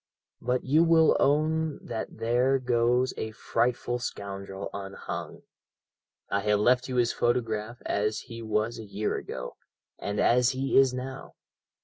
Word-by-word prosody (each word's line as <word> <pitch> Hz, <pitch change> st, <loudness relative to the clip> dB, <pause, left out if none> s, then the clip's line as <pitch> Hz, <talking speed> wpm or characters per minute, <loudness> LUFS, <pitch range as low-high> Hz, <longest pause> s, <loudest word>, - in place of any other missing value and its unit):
But 125 Hz, +1 st, 0 dB
you 150 Hz, +5 st, +4 dB
will 165 Hz, -1 st, +5 dB
own 155 Hz, +2 st, +2 dB
that 115 Hz, -2 st, -5 dB
there 125 Hz, +4 st, +2 dB
goes 125 Hz, 0 st, +2 dB
a 110 Hz, -, -3 dB
frightful 120 Hz, +2 st, -1 dB
scoundrel 100 Hz, -3 st, -6 dB
unhung. 100 Hz, -1 st, -6 dB, 0.8 s
I 100 Hz, -, 0 dB
have 105 Hz, +1 st, +2 dB
left 125 Hz, +4 st, +3 dB
you 130 Hz, -, -3 dB
his 120 Hz, -2 st, +2 dB
photograph 115 Hz, -1 st, -1 dB
as 105 Hz, +1 st, 0 dB
he 115 Hz, -1 st, -9 dB
was 110 Hz, +1 st, -1 dB
a -, -, -6 dB
year 105 Hz, 0 st, -2 dB
ago, -, -, -6 dB, 0.4 s
and 100 Hz, +1 st, -3 dB
as 125 Hz, +2 st, +4 dB
he 135 Hz, +1 st, -1 dB
is 135 Hz, -1 st, +6 dB
now. 130 Hz, +1 st, -7 dB
120 Hz, 140 wpm, -28 LUFS, 110-130 Hz, 0.8 s, is